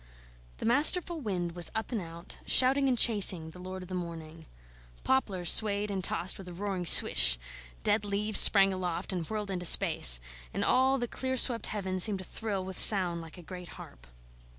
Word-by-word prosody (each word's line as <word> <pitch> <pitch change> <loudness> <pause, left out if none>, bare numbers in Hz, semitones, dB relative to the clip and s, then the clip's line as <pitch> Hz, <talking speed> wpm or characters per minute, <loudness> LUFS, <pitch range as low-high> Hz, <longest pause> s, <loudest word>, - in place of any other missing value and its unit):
The - - -9
masterful 315 +7 -1
wind 180 -7 -6
was 175 -1 -2
up 220 +3 -7
and 225 -4 -5
out, 170 0 -14
shouting 270 +2 +1
and 255 -2 -2
chasing, 190 -8 +1
the 180 - -17
lord 185 +1 -11
of - - -15
the 185 - -12
morning. 165 -3 -11 0.6
Poplars 195 -10 -1
swayed 210 -1 +1
and 190 -2 -7
tossed 185 +2 -2
with 190 - -14
a 180 - -12
roaring 190 -1 -7
swish; 60 - +5 0.5
dead 210 +1 -2
leaves 205 +1 +3
sprang 195 -2 +7
aloft, 180 0 -7
and 170 -4 -8
whirled 210 -2 -7
into 180 -2 -2
space; 60 - +3 0.4
and - - -4
all 265 +1 -1
the 240 -2 -6
clear 260 +2 -7
swept 235 -3 +2
heaven 190 -3 -7
seemed 200 +2 -1
to 190 - -11
thrill 200 -3 -7
with 190 -1 -6
sound 180 -5 +5
like 165 +1 -15
a 175 - -15
great 180 +1 -13
harp. - - -16
190 Hz, 190 wpm, -26 LUFS, 175-220 Hz, 0.6 s, sprang